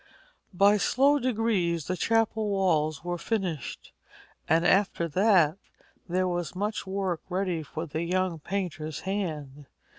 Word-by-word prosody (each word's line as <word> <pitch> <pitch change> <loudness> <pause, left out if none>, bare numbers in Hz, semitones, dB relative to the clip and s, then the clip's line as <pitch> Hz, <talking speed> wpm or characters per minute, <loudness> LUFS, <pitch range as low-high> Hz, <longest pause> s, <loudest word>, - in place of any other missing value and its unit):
By 200 +3 +5
slow 280 +7 +3
degrees 215 - 0
the 185 - -2
chapel 220 +1 +1
walls 160 -6 +1
were 175 0 -3
finished, 180 - -3 0.6
and 165 +1 +3
after 185 -2 +2
that 185 -2 +3 0.5
there 185 +1 +1
was 175 -1 -3
much 205 +1 -2
work 190 -3 -2
ready 180 -2 -1
for 155 +2 -6
the 160 0 -4
young 180 -1 0
painter's 160 -3 -4
hand. 150 -8 -4
185 Hz, 125 wpm, -27 LUFS, 165-200 Hz, 0.6 s, By